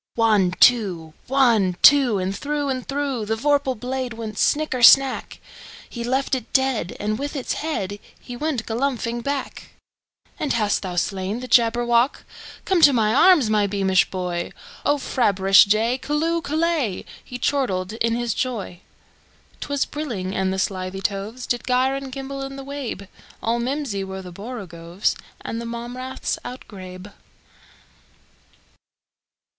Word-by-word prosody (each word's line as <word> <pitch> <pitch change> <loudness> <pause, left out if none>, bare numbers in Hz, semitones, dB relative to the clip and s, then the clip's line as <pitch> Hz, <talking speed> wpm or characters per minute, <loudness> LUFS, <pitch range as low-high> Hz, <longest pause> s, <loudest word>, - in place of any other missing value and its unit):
One, 210 -6 +3
two! 185 -10 +3
One, 235 -9 +3
two! 270 -7 +7
And 190 +1 -2
through 290 +3 -2
and 255 -1 -3
throughThe 265 -6 -2
vorpal 280 -1 +1
blade 255 0 -3
went 220 -2 -6
snicker 295 -4 +1
snack! 270 +2 +5 0.5
He 235 - -6
left 265 +3 -1
it 255 -4 -2
dead, 265 -9 0
and 215 +1 -2
with 285 +2 -4
its 270 - -2
headHe 205 -11 -3 0.4
went 295 -7 -2
galumphing 240 0 -2
back."And 280 +1 -6
hast 210 -3 +1
thou 185 -2 -5
slain 195 +4 -2
the 255 - -7
Jabberwock? 240 +2 +3 0.4
Come 375 -3 +2
to 290 - +8
my 220 -3 +2
arms, 320 -2 +6
my 210 -1 +3
beamish 190 -2 +2
boy!O 180 +9 -3
frabjous 200 -7 +4
day! 225 +5 +1
Callooh! 325 +3 0
Callay!"He 300 - -2
chortled 215 -9 -1
in 230 0 0
his 240 -2 -1
joy.'T 215 -3 -8
was 285 -1 +1
brillig, 230 -12 -4
and 190 -1 0
the 190 - -2
slithy 190 0 -3
tovesDid 220 +6 -3
gyre 255 +1 +2
and 275 -1 -5
gimble 275 +1 -6
in 270 0 -6
the 275 - -7
wabe; 275 -8 -6 0.4
All 230 +1 0
mimsy 250 -5 -2
were 190 0 -7
the 180 -1 -10
borogoves, 185 -4 -4 0.3
And 230 - -5
the 235 - -6
mome 235 +1 -6
raths 255 +1 -4
outgrabe. 190 -5 -9
235 Hz, 135 wpm, -22 LUFS, 200-270 Hz, 0.5 s, to